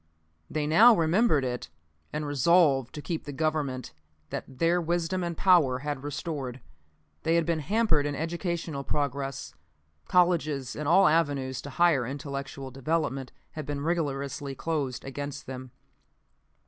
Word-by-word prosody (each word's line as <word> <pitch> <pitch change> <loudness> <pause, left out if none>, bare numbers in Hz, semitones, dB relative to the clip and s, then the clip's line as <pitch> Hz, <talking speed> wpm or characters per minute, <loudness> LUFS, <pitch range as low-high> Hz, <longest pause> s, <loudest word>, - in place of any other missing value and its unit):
They 155 -1 -1
now 220 +10 +7
remembered 165 - +3
it, 125 -1 -4 0.4
and 150 0 -3
resolved 145 -2 +3
to 150 - -6
keep 165 -2 -3
the 145 - -5
Government 140 - -2 0.4
that - - -4
their 170 +3 +2
wisdom 175 +2 -1
and 170 -2 -3
power 170 -10 +4
had 145 -3 -2
restored. 145 -4 -4 0.6
They 165 - +2
had 170 -1 +3
been 165 -1 0
hampered 160 -3 +2
in 145 - -2
educational 165 -2 -3
progress. 140 -1 -3 0.5
Colleges 155 -7 +2
and 150 -1 -4
all 190 +5 +6
avenues 145 -5 +1
to 145 - -8
higher 165 -3 +3
intellectual 140 -1 -5
development 135 -1 -2 0.2
had 155 -3 -7
been 145 -1 -3
rigorously 140 -4 -2
closed 145 -5 -2
against 140 +1 -5
them. 130 0 -7
150 Hz, 135 wpm, -28 LUFS, 135-165 Hz, 0.6 s, now